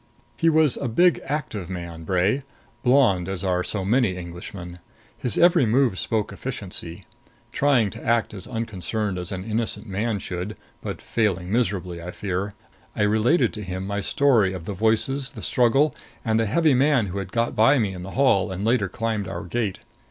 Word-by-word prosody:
He 165 - +3
was 155 -3 +3
a 140 - -2
big 175 +10 +3
active 110 - -3
man 85 -3 -6
Bray; 95 - +1 0.4
blond 120 -9 +3
as 95 -2 -4
are 90 -1 +1
so 95 -1 -2
many 110 -3 +2
Englishmen. 90 0 -8 0.4
His 125 - -1
every 170 -7 +5
move 120 -4 +2
spoke 110 -3 -1
efficiency. 100 -6 -6 0.5
Trying 125 -7 +2
to - - -10
act 115 -2 +1
as 95 -3 -8
unconcerned 110 -4 -3
as 90 - -5
an 95 -1 -4
innocent 110 0 -2
man 105 +3 -1
should 90 +2 -5 0.2
but - - -6
failing 95 -5 0
miserably, 95 -7 -1
I 85 - -6
fear 100 +2 -3 0.4
I - - +1
related 110 +6 +3
to 105 - -6
him 95 0 -4
my 100 +1 -2
story 110 -4 +3
of 90 -3 -7
the 100 - -4
voices, 115 +6 +1
the - - -8
struggle, 130 +5 +3 0.3
and 110 -1 +2
the 115 - +1
heavy 155 +7 +3
man 135 -2 +3
who 100 +1 -4
had 95 -1 -6
got 115 0 0
by 115 +7 +5
me 105 -6 0
in 90 - -7
the 95 +5 -8
hall 105 -8 +3
and 95 +2 -3
later 115 -4 +2
climbed 110 -1 -2
our - - -5
gate. 105 +1 -2
105 Hz, 180 wpm, -24 LUFS, 95-120 Hz, 0.5 s, every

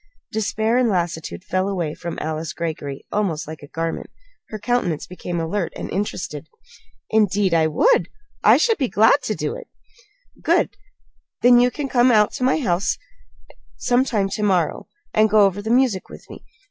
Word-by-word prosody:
Despair 220 +2 0
and 250 -2 +2
lassitude 170 -3 -2
fell 185 +1 -1
away 170 -6 -2
from 170 +1 -6
Alice 155 0 -4
Greggory 150 -4 -5
almost 180 -9 -1
like 155 0 -8
a 145 - -11
garment. 165 +2 -4 0.4
Her 215 - -5
countenance 210 -8 -1
became 175 -1 -5
alert 170 +2 -2
and - - -6
interested. 205 +2 -4 0.6
"Indeed 205 -3 +2
I 160 -1 +4
would! 475 - +3 0.3
I - - +7
should 455 -5 +2
be 265 - +1
glad 225 +6 +4
to - - -2
do - - -3
it." - - -10 0.7
"Good! - - +1 0.7
Then 245 0 +7
can 295 - -6
you - - -2
come 245 0 +4
out 210 -3 +4
to 260 - -5
my 260 - +3
home 190 - 0 1.0
sometime 245 -5 +1
to 205 - -4
morrow, 185 -6 0 0.3
and 215 0 +4
go 215 0 +5
over 195 +1 0
the 220 - -5
music 240 -5 +2
with - - -12
me? - - -11
205 Hz, 170 wpm, -21 LUFS, 170-235 Hz, 1.0 s, I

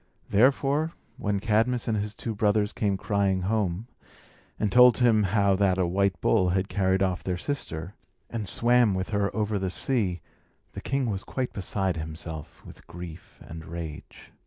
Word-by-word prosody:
Therefore, 140 +8 +3 0.2
when 100 -1 -1
Cadmus 115 +4 +1
and 110 - +1
his 105 0 -3
two 115 - -4
brothers 105 0 +1
came 100 -3 0
crying 100 -2 0
home, 100 -1 -1 0.7
and 105 -2 0
told 125 +1 +7
him 115 -3 +4
how 100 0 +2
that 95 -1 +2
a 95 - +2
white 95 +2 +1
bull 95 -5 +3
had 95 +2 0
carried 95 -1 +1
off 95 -2 -1
their 90 -1 -2
sister, 90 - -4 0.3
and 110 -4 -4
swam 120 -3 +3
with 95 +2 -3
her 100 -1 +1
over 105 -2 0
the 95 -1 -1
sea, 95 -1 0 0.5
the - - -8
king 135 -2 -1
was 95 -1 -4
quite 130 -2 -3
beside 95 -2 -1
himself 80 -1 -8
with - - -14
grief 85 -1 -10
and 80 0 -9
rage. 80 -2 -8
100 Hz, 165 wpm, -27 LUFS, 90-110 Hz, 0.7 s, told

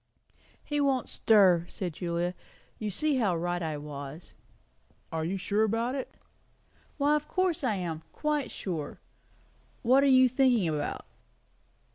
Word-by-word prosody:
"He 295 -1 -1
won't 270 -3 +1
stir," 185 -6 +4
said 180 -4 -4
Julia. 170 +1 -2 0.5
"You 215 - -2
see 295 +8 0
how 205 -8 +2
right 175 +1 -2
I 155 -2 -2
was." 145 +2 -8 0.8
"Are 160 -1 -2
you 180 +4 -2
sure 205 +3 +1
about 225 +3 0
it?" 270 -1 -4 0.9
"Why, 290 +1 +3
of 300 0 -2
course 370 -5 0
I 230 -5 +1
am! 170 -4 -4
Quite 300 -2 -1
sure. 165 -6 -5 0.8
What 260 +3 +5
are - - +4
you 260 -1 +7
thinking 250 -6 +3
about?" 150 -2 -3
205 Hz, 140 wpm, -29 LUFS, 170-265 Hz, 0.9 s, you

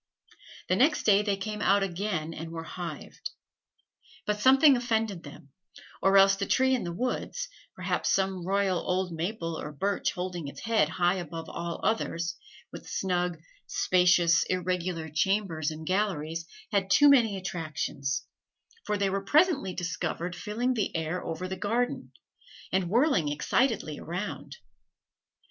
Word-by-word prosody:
The 185 - +2
next 285 +9 +3
day 205 -1 +5
they 205 -2 0
came 210 +2 -4
out 200 +1 +4
again, 175 -4 -2
and 165 +1 -6
were 165 0 -6
hived. 170 -3 -7 1.0
But 210 0 -1
something 270 +4 +7
offended 225 -6 -1
them, 145 -2 -12 0.5
or 195 +1 +5
else 195 0 +7
the 200 0 -3
tree 260 0 +3
in 255 - 0
the 175 - -3
woods 255 - -3 0.3
perhaps - - -1
some 190 -2 0
royal 195 -1 +1
old 185 0 -1
maple 165 -1 -3
or 150 - -5
birch 195 +7 -1
holding 180 -4 -4
its 140 - -9
head 225 -9 +2
high 175 +3 +1
above 165 -2 -6
all 170 -1 -4
others, 175 -5 0 0.4
with - - -10
snug, 180 -2 -1 0.3
spacious, 180 - +4
irregular 180 -2 -2
chambers 165 -1 0
and 155 0 -7
galleries 165 -4 -1 0.2
had 195 -2 +1
too 290 +8 +6
many 235 -8 +5
attractions; 155 -6 -3 0.6
for 210 - 0
they 200 -1 +1
were 195 0 -1
presently 295 - +3
discovered 175 +1 -3
filling 225 +8 -1
the 215 -7 -2
air 160 +2 -2
over 165 +3 -4
the 190 - -4
garden, 230 +6 -1 0.6
and 185 -2 +1
whirling 230 - +3
excitedly 185 - 0
around. 180 +5 -5
185 Hz, 145 wpm, -28 LUFS, 170-210 Hz, 1.0 s, something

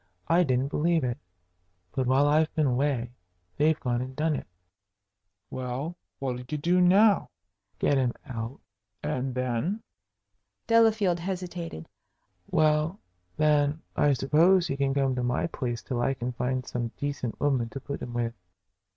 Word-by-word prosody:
I 170 +2 +4
didn't 130 -2 +1
believe 165 +1 +1
it. 120 -1 -2 0.7
But 130 -2 -1
while 135 +3 +4
I've 155 +2 +3
been 155 - +2
away 125 -2 0 0.5
they've 155 +1 +3
gone 120 -1 -1
and 130 +1 -6
done 155 +1 +1
it." - - -6 1.0
"Well, 130 +6 -4 0.2
what'll 130 -2 -3
you 150 - -2
do 175 +5 +2
now?" 200 +3 +5 0.5
"Get 140 - +2
him 125 -2 +1
out." 115 +1 -5 0.4
"And 130 0 -2
then?" 130 - -1 0.8
Delafield 220 -6 +4
hesitated. 175 - -5 0.6
"Well, 155 +3 +2 0.4
then, 150 0 +2
I 145 -1 +4
suppose, 165 +7 +4
he 135 - -2
can 140 -1 0
come 135 -2 +2
to 125 - -2
my 125 0 0
place 120 -7 -3
till 125 -4 -2
I 135 +2 +1
can 125 0 -3
find 125 +1 -2
some 120 -1 -3
decent 140 -5 -3
woman 130 -5 +1
to 135 - -6
put 140 +1 -6
him 120 - -6
with." 115 -1 -1
140 Hz, 150 wpm, -27 LUFS, 125-160 Hz, 1.0 s, now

